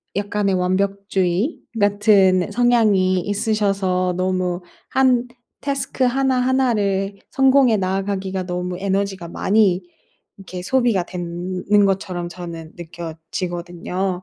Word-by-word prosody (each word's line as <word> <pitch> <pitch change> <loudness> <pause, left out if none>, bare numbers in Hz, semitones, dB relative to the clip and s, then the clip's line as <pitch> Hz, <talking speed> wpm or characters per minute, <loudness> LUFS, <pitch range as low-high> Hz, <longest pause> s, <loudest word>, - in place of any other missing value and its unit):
약간의 205 -1 0
완벽주의 195 - 0 0.2
같은 200 -3 +3
성향이 210 -7 +3
있으셔서 195 -3 0
너무 185 -1 -1 0.3
1 255 -2 +3 0.3
태스크 275 -2 -2
하나하나를 250 -6 +1 0.2
성공해 265 -4 +4
나아가기가 190 0 -2
너무 180 0 -4
에너지가 195 -2 -2
많이 195 0 +2 0.6
이렇게 185 -2 -8
소비가 240 -4 +2
된 180 +1 -5
는 205 -1 +6
것처럼 185 -3 -1
저는 170 -3 -8
느껴지거든요. 175 +2 -5
195 Hz, 255 characters per minute, -21 LUFS, 180-210 Hz, 0.6 s, 는